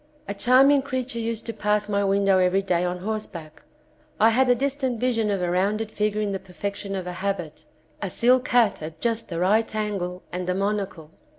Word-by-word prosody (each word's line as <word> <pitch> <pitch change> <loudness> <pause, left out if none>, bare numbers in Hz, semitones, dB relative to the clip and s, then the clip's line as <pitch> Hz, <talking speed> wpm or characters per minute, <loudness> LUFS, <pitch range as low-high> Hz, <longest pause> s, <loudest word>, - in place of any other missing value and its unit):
A 200 - -3
charming 265 +6 +5
creature 260 -3 -3
used 230 -1 -3
to 230 - -4
pass 210 -1 0
my 200 -1 0
v^indow 195 -1 +3
every 190 +2 +2
day 180 -2 +1
on 180 0 -2
horseback. 185 -7 -5 0.6
I 225 +1 +6
had 255 +3 +3
a 245 - +5
distant 265 -2 -1
vision 230 -3 +1
of 195 -3 -1
a 175 - 0
rounded 210 +4 0
figure 210 0 -1
in 205 -1 -1
the 195 - -3
perfection 195 +2 -5
of 185 -2 -4
a 180 - -5
habit, 180 -4 -4 0.4
a 200 - -2
silk 250 +5 +3
hat 230 -7 +3
at 155 +1 -7
just 230 +2 -1
the 170 - -4
right 215 +5 +2
angle 195 -4 -3
and 180 0 -4
a 180 - +1
monocle. 195 -5 -2
205 Hz, 200 wpm, -24 LUFS, 185-230 Hz, 0.6 s, I